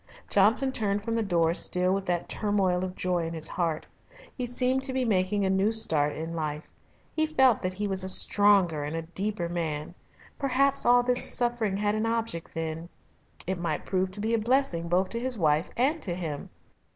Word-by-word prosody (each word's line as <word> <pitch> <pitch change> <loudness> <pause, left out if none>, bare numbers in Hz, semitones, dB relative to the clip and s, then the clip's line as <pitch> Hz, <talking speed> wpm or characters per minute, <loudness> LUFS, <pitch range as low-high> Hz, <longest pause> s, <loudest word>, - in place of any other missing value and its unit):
Johnson 220 +7 +3
turned 205 -4 -1
from 230 - -2
the 230 - +1
door 170 -5 +2
still 180 +1 +2
with 195 0 -3
that 175 -1 -1
turmoil 195 -4 0
of 185 0 -5
joy 175 -2 -1
in 165 - -5
his 160 -1 -2
heart. 165 -4 -2 0.5
He 250 -2 -3
seemed 255 +2 0
to 265 -1 -1
be 260 -1 0
making 195 -1 +1
a - - +1
new 195 +3 +2
start 155 -10 +2
in 165 +1 -5
life. 155 -1 -4 0.4
He 315 0 +1
felt 265 -6 +3
that 185 0 -2
he 205 +1 -2
was 190 -1 -2
a 190 - 0
stronger 190 -6 +3
and 150 +2 -4
a 165 - -3
deeper 185 +2 -3
man. 160 -3 -3 0.5
Perhaps 275 0 +2
all 245 0 +6
this 250 0 0
suffering 235 -5 0
had 205 0 0
an 215 +1 -1
object 225 -9 -3
then. 165 +1 -4 0.6
It 190 0 -2
might 170 - -3
prove 185 -1 0
to 205 - -2
be 220 +2 -1
a 230 - +2
blessing 225 -8 +1
both 185 +2 +2
to 235 - -3
his 250 0 -1
wife 155 -2 +1
and 285 +7 +1
to 175 -4 -3
him. 160 -5 -5
195 Hz, 200 wpm, -27 LUFS, 170-230 Hz, 0.6 s, all